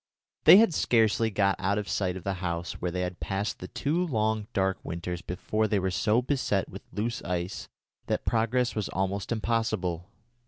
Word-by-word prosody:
They -, -, +11 dB
had 215 Hz, -5 st, +5 dB
scarcely 115 Hz, -4 st, +3 dB
got 100 Hz, -1 st, +1 dB
out 100 Hz, +2 st, +1 dB
of 105 Hz, -1 st, -2 dB
sight 95 Hz, -2 st, -1 dB
of 90 Hz, -, -9 dB
the 100 Hz, -, -1 dB
house 85 Hz, -1 st, -2 dB
where 90 Hz, -, 0 dB
they 90 Hz, +1 st, -2 dB
had 90 Hz, -1 st, -4 dB
passed 100 Hz, +1 st, -2 dB
the 90 Hz, -, -7 dB
two 145 Hz, -, -1 dB
long 110 Hz, -5 st, 0 dB
dark 95 Hz, -1 st, 0 dB
winters 85 Hz, +1 st, -4 dB
before 105 Hz, +5 st, -1 dB
they 105 Hz, -, +1 dB
were 95 Hz, -1 st, 0 dB
so 110 Hz, +6 st, +2 dB
beset 125 Hz, -8 st, 0 dB
with -, -, -9 dB
loose 115 Hz, +3 st, -2 dB
ice 90 Hz, +2 st, -3 dB, 0.4 s
that -, -, -1 dB
progress 120 Hz, +2 st, +1 dB
was 105 Hz, -3 st, -2 dB
almost 95 Hz, +2 st, -2 dB
impossible. 110 Hz, -6 st, -1 dB
100 Hz, 185 wpm, -28 LUFS, 90-115 Hz, 0.4 s, They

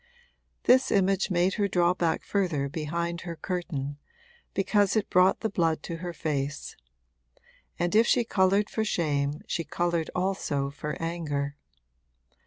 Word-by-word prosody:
This 255 Hz, +1 st, +5 dB
image 195 Hz, 0 st, +2 dB
made 180 Hz, +1 st, +2 dB
her 200 Hz, -, +3 dB
draw 180 Hz, -2 st, +3 dB
back 170 Hz, -3 st, 0 dB
further 175 Hz, -9 st, 0 dB
behind 170 Hz, +3 st, -3 dB
her 170 Hz, -2 st, -6 dB
curtain, 150 Hz, -6 st, -4 dB, 0.6 s
because 200 Hz, +1 st, +2 dB
it 215 Hz, -2 st, 0 dB
brought 180 Hz, +1 st, +4 dB
the 220 Hz, -, +1 dB
blood 165 Hz, -5 st, 0 dB
to 165 Hz, -, -5 dB
her 175 Hz, +1 st, -5 dB
face; 145 Hz, -3 st, -3 dB, 1.0 s
and 175 Hz, +2 st, 0 dB
if 225 Hz, +2 st, +5 dB
she 240 Hz, -, +4 dB
coloured 200 Hz, -1 st, +2 dB
for 220 Hz, -, -1 dB
shame 150 Hz, -7 st, 0 dB
she 165 Hz, -, -2 dB
coloured 170 Hz, +1 st, -1 dB
also 180 Hz, -7 st, -1 dB
for 150 Hz, +1 st, -5 dB
anger. 150 Hz, -4 st, -2 dB
170 Hz, 140 wpm, -27 LUFS, 150-190 Hz, 1.0 s, This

